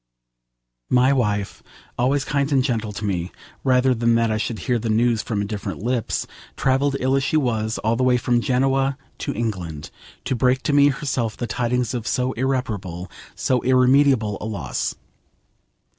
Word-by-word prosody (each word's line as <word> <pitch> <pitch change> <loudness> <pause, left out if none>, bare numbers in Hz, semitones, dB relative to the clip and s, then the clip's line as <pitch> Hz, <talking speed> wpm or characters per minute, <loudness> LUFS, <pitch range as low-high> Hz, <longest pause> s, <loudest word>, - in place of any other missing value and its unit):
My 125 +2 +4
wife, 105 -6 -1 0.3
always 135 +3 +1
kind 140 +1 0
and 135 -2 +3
gentle 110 -4 -1
to 105 +1 -5
me, 90 -3 -2 0.3
rather 130 0 +3
than 115 -1 +2
that 115 -1 +2
I 110 - 0
should 110 +1 -2
hear 120 +5 -1
the 115 0 -3
news 115 +1 +2
from 105 -3 -2
indifferent 100 -1 -5
lips, 120 -2 -1 0.3
travelled, 135 +1 +1
ill 130 +1 +1
as 135 - +1
she 155 - +1
was, 110 -6 0
all 110 +2 +2
the 130 - 0
way 125 -1 +4
from 120 0 +1
Genoa 135 +2 +1 0.2
to - - -2
England 90 -9 -4 0.3
to - - 0
break 125 +2 +2
to 145 - 0
me 145 0 +6
herself 135 -5 -1
the 120 - -3
tidings 120 +2 -1
of 120 -3 -4
so 125 0 0
irreparable, 105 - -3 0.2
so 125 -2 +1
irremediable, 130 -4 +3
a - - -4
loss. 75 - -3
120 Hz, 170 wpm, -22 LUFS, 110-130 Hz, 0.3 s, me